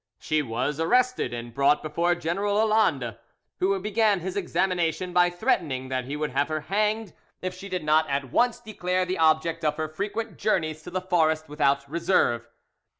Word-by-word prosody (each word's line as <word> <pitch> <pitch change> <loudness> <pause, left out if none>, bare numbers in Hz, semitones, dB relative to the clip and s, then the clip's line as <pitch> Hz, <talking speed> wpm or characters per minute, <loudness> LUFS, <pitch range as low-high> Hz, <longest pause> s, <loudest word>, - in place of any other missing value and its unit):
She 155 -1 0
was 130 +4 -2
arrested 250 +10 +2
and 120 0 -6
brought 140 +3 +3
before 170 +3 +1
General 195 +5 -1
Lalande, 205 - +2 0.4
who 195 +1 +1
began 210 0 +2
his 185 +2 -5
examination 180 -2 0
by 175 0 +5
threatening 170 - -1
that 130 -1 -2
he 140 +3 -4
would 150 0 -2
have 145 - +1
her 155 -1 -2
hanged 210 +3 -1 0.3
if 185 0 -2
she 195 +2 -9
did 180 -3 -3
not 155 +1 +3
at 140 -2 -2
once 245 -1 +2
declare 185 -5 -2
the 185 0 -3
object 160 +1 +2
of 150 -1 +1
her 155 -1 -2
frequent 205 +7 -4
journeys 155 -7 0
to 165 - -9
the 185 +1 -2
forest 160 -3 +1
without 140 -2 +1
reserve. 160 -7 +1
170 Hz, 175 wpm, -26 LUFS, 150-195 Hz, 0.4 s, by